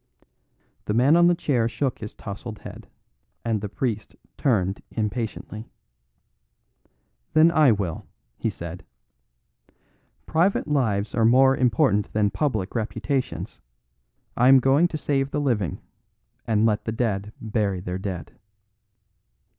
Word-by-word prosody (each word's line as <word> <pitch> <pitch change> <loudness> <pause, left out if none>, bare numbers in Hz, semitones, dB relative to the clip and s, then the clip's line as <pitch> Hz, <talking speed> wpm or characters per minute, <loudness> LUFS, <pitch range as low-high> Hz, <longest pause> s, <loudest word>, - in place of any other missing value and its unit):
The 105 - -1
man 130 +7 +5
on 175 0 +6
the 175 - +4
chair 125 -9 0
shook 130 +2 -2
his 105 - -8
tousled 105 +2 -7
head, - - -11 0.6
and 110 -3 0
the 105 - -4
priest 110 -2 -3 0.2
turned 100 -8 0
impatiently. 110 0 -4 1.6
"Then 160 +2 +6
I 155 -6 +5
will," 100 -6 -2 0.3
he - - -2
said. 85 +1 -8 1.4
"Private 170 +3 +1
lives 110 -8 0
are 115 - +1
more 130 +4 +5
important 110 -5 +2
than 105 -1 +2
public 110 -5 -1
reputations. 115 +3 -3 0.7
I 125 - +4
am 135 0 +8
going 135 +7 +4
to 160 - -5
save 140 -2 0
the 150 - -2
living, 115 - -1 0.7
and 110 -1 +2
let 110 -2 +1
the 110 - -2
dead 105 -3 -2
bury 105 -4 -1
their 90 +1 -4
dead." 95 -3 -5
115 Hz, 125 wpm, -24 LUFS, 105-135 Hz, 1.6 s, am